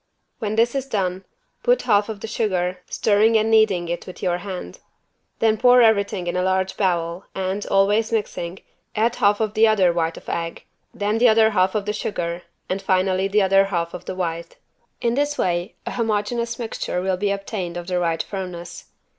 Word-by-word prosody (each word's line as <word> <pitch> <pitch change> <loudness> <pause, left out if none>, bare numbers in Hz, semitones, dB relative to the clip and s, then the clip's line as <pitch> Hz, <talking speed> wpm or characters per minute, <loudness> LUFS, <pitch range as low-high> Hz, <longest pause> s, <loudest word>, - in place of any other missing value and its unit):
When 215 -1 -2
this 230 +2 +3
is 275 -1 -2
done, 190 -5 -2 0.4
put - - +2
half 205 +1 +2
of 210 -2 -6
the - - -5
sugar, 185 -5 -1
stirring 220 +2 +3
and 220 +1 +1
kneading 215 -6 +4 0.2
with 185 - -10
your 180 -1 0
hand. 180 - -7 0.6
Then 220 -1 +2
pour 245 +1 +6
everything 200 -4 +2
in 175 - -2
a 180 - +1
large 190 0 0
bowl 175 -2 -1
and, 190 +2 -2
always 205 +3 +2
mixing, 195 -5 -3 0.3
add 225 +2 +1
half 205 0 +3
of 215 -2 -1
the 220 0 +5
other 190 -5 +3
white 165 -1 -1
of - - -13
egg, 165 0 -4 0.3
then 210 +2 -1
the 245 0 +6
other 220 0 +5
half 190 -1 +2
of 205 -2 -1
the 210 - -1
sugar 175 -5 -3 0.3
and 190 +1 -2
finally 185 0 +1
the 205 +1 +2
other 195 +1 +4
half 170 -3 -2
of 180 - -8
the 185 - -5
white. 170 -2 -4 0.4
In 235 -1 +1
this 290 +2 0
way 175 +3 -1
an - - -4
homogenous 235 +1 -1
mixture 225 -6 -3
will 185 +1 0
be 200 +2 -1
obtained 195 -3 -3
of 175 - -5
the 180 0 -1
right 165 -2 0
firmness. 180 -3 -7
195 Hz, 190 wpm, -22 LUFS, 180-220 Hz, 0.6 s, pour